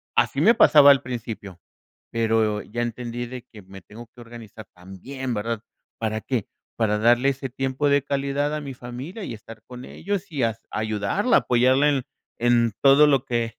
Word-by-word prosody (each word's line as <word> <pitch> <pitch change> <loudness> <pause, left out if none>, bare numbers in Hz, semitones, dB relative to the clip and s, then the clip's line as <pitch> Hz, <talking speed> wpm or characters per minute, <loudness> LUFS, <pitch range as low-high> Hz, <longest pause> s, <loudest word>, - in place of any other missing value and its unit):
Así - - +1
me 230 - +6
pasaba 145 -10 +7
al 135 - +3
principio, 110 -7 -7 0.5
pero 110 -2 0
ya 120 +2 -5
entendí 120 +1 -4
de 125 0 -8
que 110 -4 -14
me 95 0 -13
tengo 115 +3 -12
que 120 - -21
organizar 115 -2 -12
también, 95 +9 -8
¿verdad? 110 +1 -3 0.4
¿Para 110 -1 -2
qué? 120 -1 -3 0.3
Para 105 -2 0
darle 120 +5 +3
ese 135 0 -4
tiempo 135 +3 -2
de 140 -1 +3
calidad 140 +1 -1
a 150 - -4
mi 140 -2 -7
familia 130 - -8
y 120 - -6
estar 110 +1 -13
con 125 0 -10
ellos 200 0 -5
y 145 -4 -3
a 115 -2 0
ayudarla, 110 - 0
apoyarla 130 +4 +3
en 140 -3 0 0.4
en 120 -1 +2
todo 140 +2 +6
lo 135 -3 +2
que 115 -3 -2
120 Hz, 175 wpm, -23 LUFS, 110-135 Hz, 0.5 s, pasaba